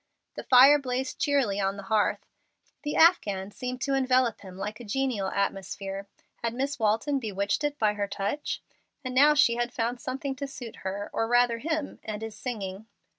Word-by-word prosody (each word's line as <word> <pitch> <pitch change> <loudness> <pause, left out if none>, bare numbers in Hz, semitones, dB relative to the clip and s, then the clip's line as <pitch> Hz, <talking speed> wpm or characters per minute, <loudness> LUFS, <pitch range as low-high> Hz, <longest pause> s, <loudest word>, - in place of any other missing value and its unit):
The - - -6
fire 270 +3 +7
blazed 260 -1 -3
cheerily 265 -9 +1
on 195 0 0
the 200 - -7
hearth. 210 +2 +1 0.6
The 295 - -3
afghan 205 - +4
seemed 250 +4 -5
to 275 - 0
envelop 255 -3 +2
him 185 -2 -11
like 210 +2 -5
a - - -8
genial 235 -3 -1
atmosphere. 195 0 -3 0.3
Had 230 0 -3
Miss 275 +2 -2
Walton 225 +6 +1
bewitched 200 +1 -1
it 295 0 -1
by 215 -4 +2
her 205 -1 -2
touch? 200 +9 -3 0.4
And 255 - -3
now 290 +4 +6
she 235 -5 +4
has 240 0 0
found 240 0 -2
something 270 +1 -3
to 280 0 -4
suit 245 -4 -9
her, 195 +2 -5
or 225 - 0
rather 240 0 +3
him, 315 +1 -3
and 215 0 -5
is 225 -1 -6
singing. 210 -4 -5
235 Hz, 180 wpm, -27 LUFS, 205-270 Hz, 0.6 s, fire